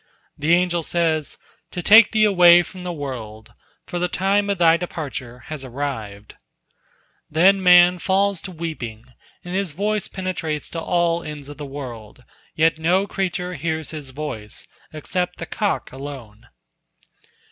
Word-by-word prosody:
The 160 +4 +3
angel 175 -1 +1
says, 160 -2 -1 0.3
"To 175 - -6
take 220 +1 +8
thee 220 -1 +3
away 175 -4 +7
from 185 +1 -11
the 180 0 -4
world, 120 -8 -7 0.3
for 175 - -4
the 180 - +1
time 200 +3 +1
of 200 - 0
thy 165 -1 +5
departure 140 -8 -6
has 155 -3 -7
arrived." 120 -6 -6 1.0
Then 190 +5 +4
man 180 0 +6
falls 195 +1 +1
to 190 - -7
weeping, 155 -10 -6 0.4
and 175 - -6
his 190 -4 -1
voice 210 +4 -1
penetrates 165 -6 -4
to 165 - -4
all 170 0 +1
ends 150 -3 -8
of 145 - -10
the 145 -2 -7
world, 125 -5 -9 0.3
yet 160 0 +2
no 180 +5 +2
creature 180 -2 -3
hears 160 -3 -3
his 150 -4 -8
voice, 130 -7 -7 0.3
except 180 +4 -3
the - - -5
cock 205 -2 -2
alone. 130 -5 -9
165 Hz, 145 wpm, -22 LUFS, 140-180 Hz, 1.0 s, take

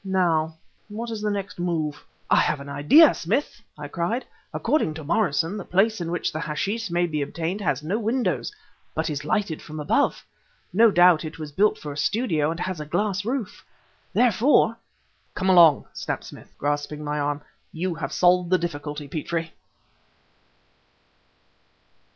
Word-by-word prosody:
Now 170 -5 +1 0.3
what 230 +3 -5
is 220 -2 -4
the 210 - 0
next 195 -4 -4
move?" 160 -4 -2 0.2
"I - - +4
have 150 - +2
an 140 0 -9
idea, 150 - +6
Smith!" 225 - -2 0.2
I 145 -1 -6
cried. 175 - -2 0.3
"According 230 - 0
to 160 - -7
Morrison, 170 +1 0
the 200 - -5
place 200 +3 +1
in 165 - -3
which 175 -1 -1
the 155 - -4
hashish 195 +7 -2
may 175 +1 +1
be 155 -3 -2
obtained 170 +7 -3
has 150 -7 -1
no 190 +8 -1
windows 235 - -1 0.4
but - - -1
is 145 0 -4
lighted 180 0 -1
from 155 0 -8
above. 280 - +1 0.5
No 225 +4 +6
doubt 175 -4 +5
it 155 0 -7
was 155 -2 -7
built 205 +8 +2
for 145 -1 -7
a - - -10
studio 160 - +1
and 165 +1 -4
has 185 -2 -3
a 150 - -5
glass 200 +3 -1
roof. 235 -2 -4 0.5
Therefore 240 0 +3 0.3
" - - -41
"Come 190 - 0
along!" 165 -6 +6
snapped - - -4
Smith, - - -12
grasping 145 +1 -2
my 150 0 -2
arm; 145 0 -2 0.3
"you 175 +2 -2
have 155 -4 -5
solved 180 -1 +3
the 185 - +4
difficulty, 150 -3 -5
Petrie." 165 +3 -3
170 Hz, 165 wpm, -24 LUFS, 150-205 Hz, 0.5 s, idea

